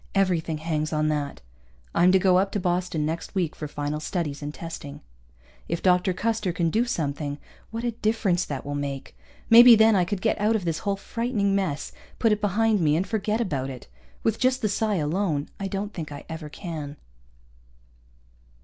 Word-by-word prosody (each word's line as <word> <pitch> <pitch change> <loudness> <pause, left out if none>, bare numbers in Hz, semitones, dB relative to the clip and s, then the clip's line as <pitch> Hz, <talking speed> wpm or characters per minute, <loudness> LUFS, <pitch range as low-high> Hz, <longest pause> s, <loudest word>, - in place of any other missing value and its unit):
Everything 175 -5 +1
hangs 155 -1 -2
on 155 -1 +1
that. 145 - -2 0.5
I'm 175 +2 +5
to 190 - +6
go 185 -1 +4
up 195 +1 0
to 205 - 0
Boston 175 -4 0
next 165 +5 -4
week, 175 -5 0
for 150 - -5
final 145 +1 -3
studies 155 -3 -3
and 145 0 -4
testing. 150 -3 -8 0.7
If 170 0 -3
Dr. 180 0 +3
Custer 215 0 -1
can 170 -1 0
do 230 +6 +2
something, 145 -9 -2 0.3
what 230 +1 -5
a 240 - 0
difference 215 -5 +1
that 140 -2 -5
will 145 - -4
make! 140 -1 -4 0.3
Maybe 235 +1 +10
then 220 0 +5
I 185 - +4
could 200 +2 -3
get 220 +1 0
out 215 +2 +3
of 200 -5 -2
this 165 -1 -1
whole 200 -1 -1
frightening 210 0 -1
mess, 180 -8 -1 0.3
put 225 - +3
it 210 0 +1
behind 210 +1 +2
me 150 -2 +3
and 175 +4 +1
forget 215 +1 -1
about 140 - -1
it. 130 -3 -9 0.4
With 225 -1 +1
just 255 0 +1
the 215 - +2
psi 215 +1 0
alone, 155 -2 -1
I 195 - -2
don't 200 +2 -4
think 155 -4 -6
I 145 - -8
ever 160 -2 -7
can. 150 -4 -6
180 Hz, 190 wpm, -25 LUFS, 150-210 Hz, 0.7 s, Maybe